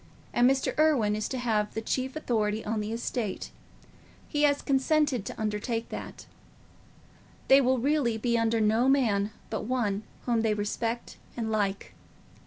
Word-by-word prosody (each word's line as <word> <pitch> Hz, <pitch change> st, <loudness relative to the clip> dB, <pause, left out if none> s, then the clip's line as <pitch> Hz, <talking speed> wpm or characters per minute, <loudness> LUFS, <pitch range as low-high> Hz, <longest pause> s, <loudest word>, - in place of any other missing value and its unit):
And 245 Hz, +1 st, +5 dB
Mr. 270 Hz, 0 st, 0 dB
Irwine 265 Hz, -10 st, +3 dB
is 215 Hz, 0 st, -2 dB
to 260 Hz, -, -3 dB
have 220 Hz, -4 st, 0 dB
the -, -, 0 dB
chief 260 Hz, +4 st, -2 dB
authority 220 Hz, -7 st, -1 dB
on 215 Hz, +1 st, -1 dB
the 210 Hz, +1 st, -3 dB
estate—he 235 Hz, -, -6 dB
has 285 Hz, -1 st, +3 dB
consented 275 Hz, -4 st, +2 dB
to -, -, -7 dB
undertake 220 Hz, +2 st, -2 dB
that. -, -, -7 dB, 1.2 s
They 270 Hz, +1 st, +8 dB
will 260 Hz, 0 st, +2 dB
really 260 Hz, -3 st, +1 dB
be 235 Hz, +1 st, 0 dB
under 230 Hz, 0 st, +2 dB
no 220 Hz, +4 st, +3 dB
man 220 Hz, -7 st, +2 dB, 0.2 s
but 220 Hz, -, -3 dB
one 215 Hz, -5 st, 0 dB, 0.2 s
whom 235 Hz, -2 st, +2 dB
they 220 Hz, -1 st, +1 dB
respect 225 Hz, +3 st, -3 dB, 0.2 s
and 225 Hz, -2 st, -2 dB
like. 200 Hz, -2 st, -1 dB
230 Hz, 150 wpm, -28 LUFS, 215-260 Hz, 1.2 s, They